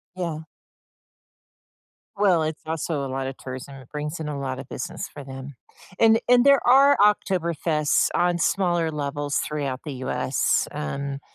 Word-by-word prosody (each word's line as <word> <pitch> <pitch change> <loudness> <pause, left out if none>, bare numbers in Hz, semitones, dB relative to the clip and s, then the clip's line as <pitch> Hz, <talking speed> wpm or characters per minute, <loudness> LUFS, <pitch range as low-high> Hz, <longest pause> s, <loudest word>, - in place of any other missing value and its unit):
Yeah. 165 -4 -4 1.7
Well, 190 -5 +3
it's 155 0 -3
also 155 -2 -2
a - - -3
lotta 135 0 -3
tourism, 130 +1 -8
it 130 -2 -13
brings 150 +2 -4
in 155 - -4
a 145 -2 -4
lot 130 -1 -4
of 135 - -8
business 175 -1 -5
for 145 - -8
them. 135 0 -9 0.4
And 225 0 +6
and 245 +1 +5
there 280 -1 +5
are 275 +3 +6
Oktoberfest 170 -7 +2
on 175 0 +2
smaller 175 -3 +1
levels 145 -1 -3
throughout 140 -4 -3
the 145 - -4
US, 130 0 +1
um, 140 - -4
150 Hz, 150 wpm, -24 LUFS, 140-175 Hz, 1.7 s, And